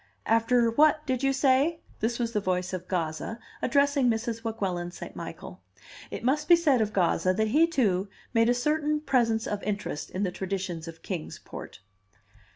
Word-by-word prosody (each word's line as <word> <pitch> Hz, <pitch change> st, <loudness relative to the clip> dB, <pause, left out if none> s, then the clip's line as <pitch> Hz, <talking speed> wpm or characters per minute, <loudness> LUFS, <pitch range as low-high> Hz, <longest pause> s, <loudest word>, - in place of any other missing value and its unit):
"After 230 Hz, +1 st, +3 dB
what, 305 Hz, +4 st, +4 dB
did 260 Hz, -2 st, -1 dB
you 275 Hz, 0 st, +3 dB
say?" 275 Hz, +4 st, +2 dB, 0.2 s
This 230 Hz, +2 st, 0 dB
was 235 Hz, -2 st, -1 dB
the 210 Hz, -, +2 dB
voice 185 Hz, -1 st, -1 dB
of 180 Hz, -1 st, -5 dB
Gazza, 170 Hz, +4 st, -2 dB, 0.2 s
addressing 280 Hz, -1 st, +3 dB
Mrs. 225 Hz, 0 st, -2 dB
Weguelin 190 Hz, -6 st, -2 dB
St. 175 Hz, -, -9 dB
Michael. -, -, -8 dB, 0.5 s
It -, -, -6 dB
must 295 Hz, +5 st, +1 dB
be 345 Hz, -, +9 dB
said 295 Hz, -8 st, +3 dB
of 215 Hz, -1 st, 0 dB
Gazza 185 Hz, -1 st, +2 dB
that 220 Hz, +1 st, +1 dB
he, 310 Hz, +8 st, +4 dB
too, 205 Hz, -, +1 dB, 0.3 s
made 230 Hz, 0 st, +4 dB
a 245 Hz, -, +3 dB
certain 300 Hz, +3 st, 0 dB
presence 235 Hz, -6 st, +1 dB
of 205 Hz, -1 st, -3 dB
interest 205 Hz, -7 st, -3 dB
in 190 Hz, -, -3 dB
the 185 Hz, -, 0 dB
traditions 185 Hz, -3 st, -4 dB
of 165 Hz, 0 st, -10 dB
Kings 175 Hz, -5 st, -5 dB
Port. -, -, -9 dB
225 Hz, 175 wpm, -27 LUFS, 190-270 Hz, 0.5 s, be